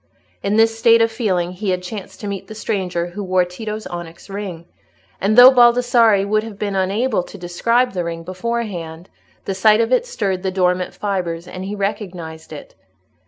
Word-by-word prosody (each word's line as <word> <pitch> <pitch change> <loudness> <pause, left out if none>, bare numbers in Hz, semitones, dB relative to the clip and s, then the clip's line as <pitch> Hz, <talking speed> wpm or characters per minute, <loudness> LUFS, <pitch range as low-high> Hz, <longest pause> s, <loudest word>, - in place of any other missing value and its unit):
In 200 +2 0
this 225 0 +3
state 230 0 +6
of 230 0 +3
feeling 190 -7 -1
he 190 +2 -4
had 180 -1 -1
chanced 195 +1 -8
to 205 - -5
meet 200 -2 -5
the 220 - -9
stranger 180 -5 -2
who 205 +4 -6
wore 185 -1 +2
Tito's 215 +4 -6
onyx 175 +2 -8
ring, 190 -5 -6 0.6
and 210 +4 +1
though 250 +1 +11
Baldassarre 240 -4 +4
would 215 +1 +2
have 220 -2 -9
been 200 -1 -3
unable 200 +4 0
to 190 - -11
describe 230 +8 +1
the 180 -2 -2
ring 165 0 -5
beforehand, 185 -4 -5 0.3
the 195 - -2
sight 210 +3 +4
of 230 +2 +1
it 480 - +2
stirred 195 - -2
the 190 - -1
dormant 180 -1 0
fibres, 180 -4 -3
and 185 0 -7
he 200 +2 -4
recognised 180 -6 -5
it. 150 - -10
195 Hz, 185 wpm, -19 LUFS, 180-220 Hz, 0.6 s, though